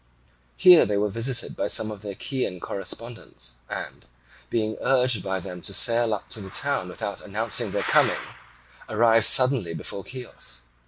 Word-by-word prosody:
Here 180 -2 +8
they 105 - -1
were 105 +1 0
visited 115 +4 -3
by - - -2
some 110 0 +1
of 105 -2 -9
their 100 -2 -6
Chian 125 -6 -3
correspondents 100 - -7 0.2
and, - - -7 0.4
being 110 -1 -1
urged 125 -5 +2
by 95 +1 -3
them 90 0 -9
to 100 - -2
sail 115 -1 +4
up 100 - -10
to 110 - -6
the 95 - -9
town 140 -4 -2
without 100 +2 -6
announcing 105 +1 -1
their - - -2
coming, - - +3 0.7
arrived 115 0 +4
suddenly 125 -10 +5
before 95 +5 -6
Chios. 125 - -9
110 Hz, 160 wpm, -24 LUFS, 95-120 Hz, 0.7 s, Here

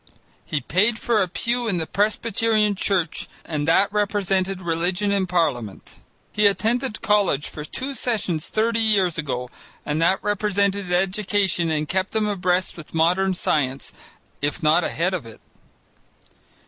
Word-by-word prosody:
He 145 - -2
paid 205 - +2
for 225 -3 +1
a 190 - +1
pew 235 +6 -1
in 190 -5 0
the 160 - -1
Presbyterian 215 +2 +1
Church 185 -4 -1 0.2
and 150 -2 -3
that 195 +5 +3
represented 195 -2 0
religion 180 +3 -1
in 195 -2 +1
Parliament. 145 - -2 0.3
He 210 0 +4
attended 225 +3 0
college 195 -8 +2
for 150 - -7
two 265 - -4
sessions 205 - -1
thirty 225 +1 0
years 195 -7 +2
ago, 125 -5 -3 0.3
and 150 +2 -1
that 180 +3 +4
represented 200 -2 0
education 190 -1 +1
and 155 -1 -1
kept 190 +4 -1
him 220 -1 +2
abreast 185 -3 0
with 165 -1 -11
modern 180 +4 +2
science, 135 -5 -1 0.5
if 145 +2 -2
not 155 +3 +4
ahead 180 +4 -1
of 155 -11 -4
it. 110 - -13
190 Hz, 145 wpm, -23 LUFS, 165-210 Hz, 0.5 s, He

